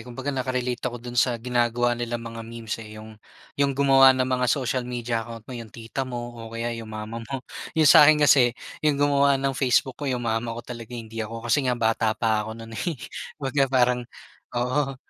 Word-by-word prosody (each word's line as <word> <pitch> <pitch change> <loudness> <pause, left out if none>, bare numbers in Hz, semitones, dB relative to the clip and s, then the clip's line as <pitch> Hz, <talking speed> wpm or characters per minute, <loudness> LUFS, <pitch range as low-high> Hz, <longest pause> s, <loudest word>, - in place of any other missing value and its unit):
kumbaga 125 +4 -5
naka-relate 125 -1 -2
ako 120 - -7
do'n 120 0 -1
sa 125 -3 +2
ginagawa 120 0 +1
nilang 120 -1 -3
mga 115 0 -7
memes, 115 -1 -5
eh, 110 -1 -10
yung, 110 +1 -10 0.5
yung 140 -1 +2
gumawa 135 -1 +6
ng 130 - +2
mga 125 -1 0
social 130 -1 0
media 120 -1 -2
account 115 -1 -9
mo 130 - -10
yung 115 -3 -7
tita 115 +4 -6
mo 120 -1 -5
o 115 - -8
kaya 115 +1 -3
yung 110 - -9
mama 110 +2 -6
mo, 130 +3 -6 0.3
yung 160 - +4
sakin 150 0 +7
kasi 125 -4 +5 0.2
yung 150 -2 +2
gumawa 140 -1 +3
ng 135 0 -1
Facebook 130 0 +1
ko 145 - -2
yung 125 -2 -2
mama 115 0 -1
ko 120 - -7
talaga 120 0 -8
hindi 115 -1 -7
ako, 115 +1 -6
kasi 130 +3 +2
nga 125 - +1
bata 110 -1 +1
pa 110 -1 +1
ako 110 - -7
no'n, 115 0 -10
eh, 165 +7 -3 0.4
kumbaga 140 -1 +1
parang 125 -1 +3 0.6
oo. 135 +3 0
120 Hz, 205 wpm, -25 LUFS, 115-130 Hz, 0.6 s, sakin